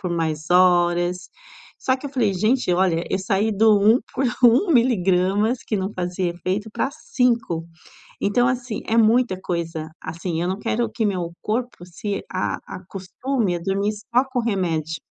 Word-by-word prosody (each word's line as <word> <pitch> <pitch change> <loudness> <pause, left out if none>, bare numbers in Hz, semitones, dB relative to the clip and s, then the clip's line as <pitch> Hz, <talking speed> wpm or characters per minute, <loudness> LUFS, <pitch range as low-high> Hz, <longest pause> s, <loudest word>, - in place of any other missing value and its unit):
por 180 -3 -3
mais 160 -2 -2
horas. 175 0 +3 0.5
Só 260 0 +1
que 260 - -16
eu 275 - -7
falei: 230 -8 +1
"Gente, 215 +3 +1
olha, 175 -2 +2
eu 190 - +1
saí 195 +3 0
do 210 0 +5
1 220 +4 +5 0.2
por 265 +1 0 0.2
1 245 - +5
miligramas 205 - +2
que 215 - -2
não 190 0 -2
fazia 180 0 -2
efeito 185 +5 -3
pra 265 - -1
5. 235 - 0 0.5
Então, 245 +5 +2
assim, 250 -4 -3
é 225 - 0
muita 230 -3 +3
coisa, 165 -3 -3
assim, 165 +1 -4
eu 175 - -1
não 190 +1 -2
quero 235 +2 -1
que 225 - -2
meu 180 -4 -2
corpo 235 -3 -3
se 200 +3 -4
a 185 - -1
acostume 195 +4 -3
a 170 - -6
dormir 195 +3 0
só 235 +5 0
com 250 - +1
remédio, 170 -8 -1
195 Hz, 165 wpm, -22 LUFS, 175-230 Hz, 0.5 s, do